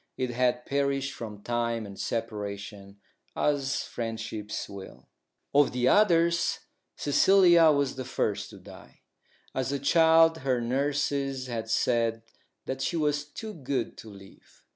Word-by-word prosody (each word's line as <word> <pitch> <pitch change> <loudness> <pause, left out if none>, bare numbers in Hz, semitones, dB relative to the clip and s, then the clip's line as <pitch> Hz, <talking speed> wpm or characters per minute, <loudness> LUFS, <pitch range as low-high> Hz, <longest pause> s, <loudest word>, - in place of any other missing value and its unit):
It 130 -1 -2
had 125 0 0
perished 140 0 -1
from 105 -3 -8
time 115 -1 -1
and 100 -1 -10
separation, 100 -3 -5 0.4
as 140 -2 0
friendships 110 -2 -5
will. 95 -10 -11 0.4
Of 145 -2 +4
the 125 0 +2
others, 170 -3 +3 0.4
Cecilia 175 +2 +5
was 140 -2 0
the 130 - -3
first 110 -5 -2
to - - -12
die. - - -15 0.5
As 130 0 -2
a 140 - 0
child 165 +3 +4
her 130 -2 0
nurses 135 +1 -1
had 115 -3 -5
said 115 -1 +1 0.4
that 130 0 -4
she 170 - -1
was 150 -1 0
too 215 +8 -8
good 135 - -3
to 110 - -10
live. 100 -1 -16
130 Hz, 135 wpm, -28 LUFS, 115-145 Hz, 0.5 s, Cecilia